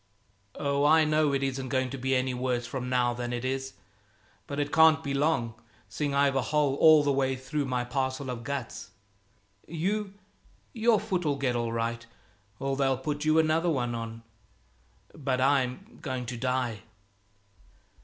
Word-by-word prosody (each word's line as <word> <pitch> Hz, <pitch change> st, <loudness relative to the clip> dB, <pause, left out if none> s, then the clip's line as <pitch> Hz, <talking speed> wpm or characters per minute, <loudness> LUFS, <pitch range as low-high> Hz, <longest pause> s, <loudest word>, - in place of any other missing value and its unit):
Oh, 140 Hz, 0 st, 0 dB
I 155 Hz, +2 st, +5 dB
know 155 Hz, -1 st, +2 dB
it 135 Hz, 0 st, 0 dB
isn't 135 Hz, -1 st, -2 dB
going 130 Hz, -1 st, 0 dB
to 135 Hz, -, -5 dB
be 130 Hz, +1 st, 0 dB
any 130 Hz, 0 st, 0 dB
worse 125 Hz, -1 st, -1 dB
from 125 Hz, +1 st, -5 dB
now 125 Hz, -1 st, +2 dB
than 120 Hz, 0 st, -4 dB
it 120 Hz, +1 st, -3 dB
is, 135 Hz, 0 st, -3 dB, 0.7 s
but 140 Hz, 0 st, -4 dB
it 145 Hz, 0 st, -1 dB
can't 160 Hz, 0 st, +6 dB
be 140 Hz, -, -2 dB
long, 140 Hz, -5 st, +1 dB, 0.4 s
seeing 140 Hz, +7 st, -2 dB
I've 140 Hz, -1 st, +3 dB
a 135 Hz, -, +2 dB
hole 145 Hz, +3 st, +1 dB
all 155 Hz, -2 st, +7 dB
the 145 Hz, -, +2 dB
way 135 Hz, -1 st, +1 dB
through 140 Hz, +3 st, -3 dB
my 125 Hz, -2 st, -1 dB
parcel 130 Hz, +1 st, -2 dB
of 120 Hz, -1 st, -6 dB
guts. 140 Hz, -2 st, -5 dB, 0.8 s
You, 195 Hz, +5 st, -2 dB, 0.6 s
your 225 Hz, -2 st, +3 dB
foot'll 180 Hz, -8 st, -1 dB
get 135 Hz, -3 st, -1 dB
all 120 Hz, -1 st, -1 dB
right, 115 Hz, 0 st, -2 dB, 0.5 s
or 135 Hz, +2 st, -2 dB
they'll 135 Hz, -1 st, +1 dB
put 145 Hz, +3 st, -3 dB
you 155 Hz, +1 st, +3 dB
another 160 Hz, +2 st, +3 dB
one 125 Hz, -6 st, -1 dB
on. 115 Hz, 0 st, -6 dB, 0.9 s
But 135 Hz, -3 st, -2 dB
I'm 135 Hz, -, 0 dB
going 130 Hz, -3 st, -4 dB
to 120 Hz, +1 st, -5 dB
die." 125 Hz, -2 st, -1 dB
135 Hz, 165 wpm, -28 LUFS, 125-150 Hz, 0.9 s, all